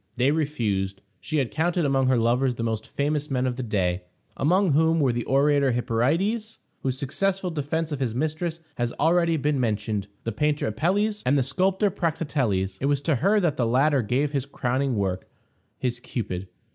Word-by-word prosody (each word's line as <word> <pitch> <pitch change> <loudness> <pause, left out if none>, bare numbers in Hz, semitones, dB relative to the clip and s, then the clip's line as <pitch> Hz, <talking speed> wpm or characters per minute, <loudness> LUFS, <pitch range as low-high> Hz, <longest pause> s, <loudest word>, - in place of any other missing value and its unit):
They 130 +3 +3
refused. 110 -11 -1 0.2
She 155 - -2
had 130 -7 0
counted 170 - +1
among 135 -2 +2
her 130 -1 +3
lovers 120 +2 +2
the 115 - -4
most 110 -2 -2
famous 150 +1 -1
men 130 -2 0
of 125 -1 -1
the 130 - -4
day, 95 -6 0 0.3
among 180 +5 +2
whom 160 +3 +3
were 135 -5 +2
the 120 0 -2
orator 140 -1 +3
Hyperides, 155 - 0 0.2
whose 130 -1 -1
successful 185 +7 -1
defense 160 +1 -2
of 145 - -3
his 120 -4 -1
mistress 160 +4 -2 0.2
has 120 -1 -1
already 165 +1 +3
been 145 -1 0
mentioned; 105 -3 -1 0.2
the 115 - -2
painter 150 +6 0
Apelles, 200 - 0
and 135 +3 +3
the 135 - +3
sculptor 190 - +1
Praxiteles. 130 - -1
It 140 - +1
was 140 -1 +1
to 145 -2 +1
her 200 - +3
that 170 -6 +1
the 120 - +1
latter 135 +3 +3
gave 130 +6 0
his 140 -2 -2
crowning 130 -1 -1
work 95 -3 -2 0.5
his 120 -1 -2
Cupid. 95 -7 -4
140 Hz, 185 wpm, -25 LUFS, 120-160 Hz, 0.5 s, They